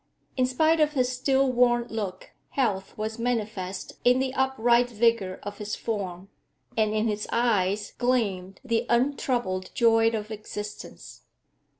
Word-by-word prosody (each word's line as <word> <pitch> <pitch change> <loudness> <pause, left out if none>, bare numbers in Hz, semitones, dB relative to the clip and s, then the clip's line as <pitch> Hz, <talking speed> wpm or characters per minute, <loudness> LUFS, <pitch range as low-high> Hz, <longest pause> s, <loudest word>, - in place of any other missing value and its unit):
In 255 -1 +2
spite 315 +5 +2
of 305 -1 +3
his 255 -2 +1
still 265 +1 +2
worn 240 -1 +3
look, 200 -4 -5 0.2
health 205 -8 -1
was 220 +2 -4
manifest 215 -6 -3
in 250 +1 +5
the 260 0 -1
upright 245 -2 +2
vigour 230 -5 +1
of 205 0 -7
his 210 0 -3
form, 195 -4 -4 0.5
and 215 -1 +2
in 215 +1 +1
his 210 -1 -2
eyes 210 -4 +1
gleamed 200 -7 0
the 230 +1 0
untroubled 240 -7 0
joy 225 -1 +4
of 220 -1 -4
existence. 210 -1 -8
225 Hz, 135 wpm, -26 LUFS, 205-250 Hz, 0.5 s, in